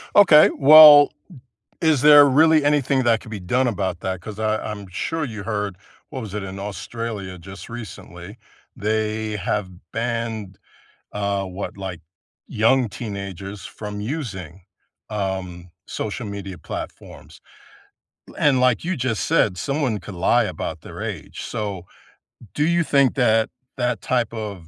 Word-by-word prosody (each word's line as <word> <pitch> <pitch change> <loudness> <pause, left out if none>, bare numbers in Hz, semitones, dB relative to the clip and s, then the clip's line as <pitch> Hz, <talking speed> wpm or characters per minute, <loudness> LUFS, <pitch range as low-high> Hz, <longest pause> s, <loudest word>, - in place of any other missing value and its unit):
Okay, 170 -7 +8
well, 150 0 +9 0.7
is 155 -5 +2
there 145 -1 +9
really 155 +3 +5
anything 140 -2 +2
that 115 -2 +3
could 115 - -12
be 105 -2 -6
done 125 +9 0
about 95 -6 -2
that? 95 -1 -3
'Cause 105 +4 -9
I 110 0 0
I'm 100 -2 -7
sure 155 - -3
you 110 -6 -6
heard 105 -3 -3 0.3
what 130 - -6
was 105 -4 -8
it? 105 - -3
In 95 0 -7
Australia 100 -1 -6
just 95 +2 -11
recently, 105 -3 -10 0.4
they 110 0 -2
have 100 0 -2 0.2
banned, 115 -4 -3 0.6
uh, 100 -1 -1
what, 95 +2 -7
like, 95 -3 -6 0.5
young 115 +2 +2
teenagers 100 -2 -7
from 105 -1 -7
using, 100 - -6 0.5
um, 95 -4 -4 0.2
social 110 +3 -4
media 100 -2 -7
platforms. - - -9 0.9
Eh, - - -14
and 140 -3 +3
like 125 -2 +2
you 185 +2 -1
just 125 -4 -1
said, 110 - +2
someone 135 - -1
could 100 - -10
lie 85 - +3
about - - -5
their - - -10
age, - - -6
so 100 -4 -5 0.7
do 150 +1 +1
you 170 0 +2
think 140 -4 +2
that 115 -4 +2 0.3
that 125 -1 -1
type 120 -3 -1
of 105 -7 -6
110 Hz, 145 wpm, -22 LUFS, 100-130 Hz, 0.9 s, well